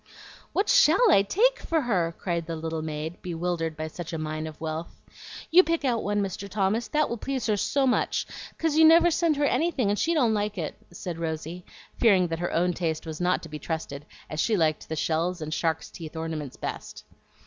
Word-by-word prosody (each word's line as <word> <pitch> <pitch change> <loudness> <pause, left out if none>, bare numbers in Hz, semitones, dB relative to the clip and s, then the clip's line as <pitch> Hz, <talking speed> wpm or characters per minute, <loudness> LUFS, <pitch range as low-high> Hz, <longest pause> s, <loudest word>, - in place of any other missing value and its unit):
"What 395 - +1
SHALL - - +5
I 195 - +6
take 465 - +2
for 325 -1 0
her?" 180 -10 0
cried 170 -3 -2
the 165 - -3
little 160 0 -3
maid, 155 +2 -5
bewildered 170 -2 -2
by 155 - -3
such 165 +1 -7
a - - -1
mine 155 0 -3
of 155 - -10
wealth. 160 +1 -5 0.5
"You 355 +3 +9
pick 330 -4 -1
out 240 -3 +1
one, 205 0 0
Mr. 195 +1 -5
Thomas, 210 +3 0
that 305 -1 +1
will 235 - -3
please 265 -2 -3
her 215 - +2
so 270 +7 +1
much, 255 - +1 0.3
'cause 325 -2 0
you 320 - +6
never 335 +2 +7
send 330 -1 +2
her 290 - +2
anything, 270 -6 +1
and 205 - -1
she 335 +1 +1
don't 245 -8 +3
like 210 -1 -1
it," 160 -4 -3 0.2
said 175 -1 -6
Rosy, 165 +2 -4 0.3
fearing 190 -6 +4
that 165 0 -3
her 175 - -2
own 175 +2 +1
taste 165 -2 -2
was 160 +1 -6
not 180 +1 +1
to 165 - -8
be 150 0 -6
trusted, 150 -3 -5 0.2
as 155 - -5
she 215 +5 +2
liked 155 -3 0
the 160 - -2
shells 165 +3 0
and 155 -1 -4
shark's 160 -1 -1
teeth 165 -2 -9
ornaments 160 -4 -5
best. - - -6
175 Hz, 215 wpm, -26 LUFS, 160-240 Hz, 0.5 s, You